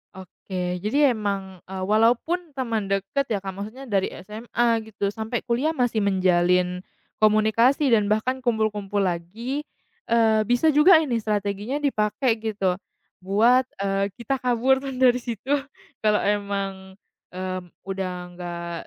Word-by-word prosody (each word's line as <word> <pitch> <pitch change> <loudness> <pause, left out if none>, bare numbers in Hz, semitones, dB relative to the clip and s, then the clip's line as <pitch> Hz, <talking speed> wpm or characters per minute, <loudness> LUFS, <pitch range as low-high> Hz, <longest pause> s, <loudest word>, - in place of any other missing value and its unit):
Oke, 180 -1 -5
jadi 265 +8 +3
emang, 195 -4 -3
eee, 190 0 -5
walaupun 245 - +1
teman 225 -6 -2
dekat 195 +8 -1
ya, 210 -3 -1
Kak, 195 - -4
maksudnya 215 +8 -8
dari 195 -2 +1 0.2
SMA 230 +3 0
gitu, 200 -2 -2
sampai 220 +2 -4
kuliah 260 +7 0
masih 245 -5 +1
menjalin 180 -2 +2 0.4
komunikasi 220 +6 +3
dan 210 -3 +4
bahkan 220 +5 0
kumpul-kumpul 210 -4 0
lagi, 220 - -3 0.4
eee, 225 -2 +3
bisa 245 +6 +3
juga 300 +6 +7
ini 240 -5 -1
strateginya 210 +2 -2
dipakai 225 -1 +1
gitu, 200 -5 -1 0.4
buat, 230 +7 +3 0.2
eee, 195 0 0
kita 250 +3 -2
kabur 255 +1 +2
kan 270 -1 -6
dari 250 -1 +4
situ. 240 +2 -5 0.5
Kalau 210 -1 +2
emang, 195 -2 -2 0.4
eee, 185 0 -3 0.2
udah 190 -1 -3 0.2
nggak 175 -1 -6
215 Hz, 130 wpm, -24 LUFS, 195-245 Hz, 0.5 s, juga